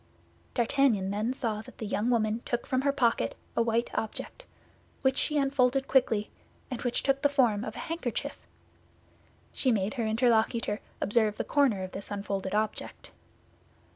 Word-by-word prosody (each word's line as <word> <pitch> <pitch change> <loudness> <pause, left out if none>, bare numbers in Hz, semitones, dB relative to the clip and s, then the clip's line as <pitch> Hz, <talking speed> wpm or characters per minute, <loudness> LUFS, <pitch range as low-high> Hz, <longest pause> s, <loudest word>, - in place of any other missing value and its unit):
D'Artagnan 235 -5 +2
then 215 +4 0
saw 230 -5 -2
that - - -14
the 220 - -5
young 210 +3 0
woman 225 -1 +1
took 240 - -2
from 260 0 0
her 280 +1 +2
pocket 235 - +1 0.2
a - - +3
white 230 +1 +1
object, 360 - -4 0.6
which 265 0 +3
she 300 +2 +1
unfolded 270 -1 +2
quickly, 230 -6 +2 0.4
and 250 - -4
which 245 -1 0
took 275 0 +2
the 285 - +4
form 240 -7 +2
of - - -5
a - - -5
handkerchief. 320 -9 -3 1.1
She 260 - +2
made 205 -2 0
her 240 -4 -2
interlocutor 225 -1 +2 0.2
observe 215 0 +2
the - - -1
corner 260 -10 +2
of 185 - -6
this 195 - -7
unfolded 200 -1 -3
object. 215 0 -3
235 Hz, 160 wpm, -29 LUFS, 210-265 Hz, 1.1 s, the